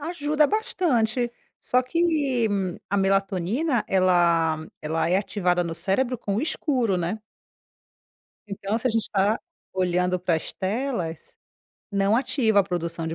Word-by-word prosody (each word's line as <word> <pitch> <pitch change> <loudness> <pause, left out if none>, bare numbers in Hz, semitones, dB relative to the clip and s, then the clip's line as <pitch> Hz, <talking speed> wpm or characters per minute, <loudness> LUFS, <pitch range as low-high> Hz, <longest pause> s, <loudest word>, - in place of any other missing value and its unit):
Ajuda 300 -1 +1
bastante, 265 - 0 0.3
só 250 - +2
que 285 -5 +1 0.4
a 200 - +1
melatonina 195 - +1
ela 175 -4 +3 0.2
ela 160 +2 0
é 180 - +3
ativada 180 -3 0
no 170 -1 -4
cérebro 200 +9 0
com 200 -3 -2
o - - +1
escuro, 255 - 0
né. 180 +4 -2 1.3
Então 200 +1 -2
se 235 - 0
a - - +1
gente 225 -1 0
tá 205 +3 +2 0.3
olhando 180 0 +1
para 175 -1 +1
as 160 - -4
telas, 190 - -3 0.6
não 200 +1 +2
ativa 230 -5 +2
a - - +2
produção 170 -3 -3
de 160 - -3
200 Hz, 135 wpm, -25 LUFS, 180-255 Hz, 1.3 s, ela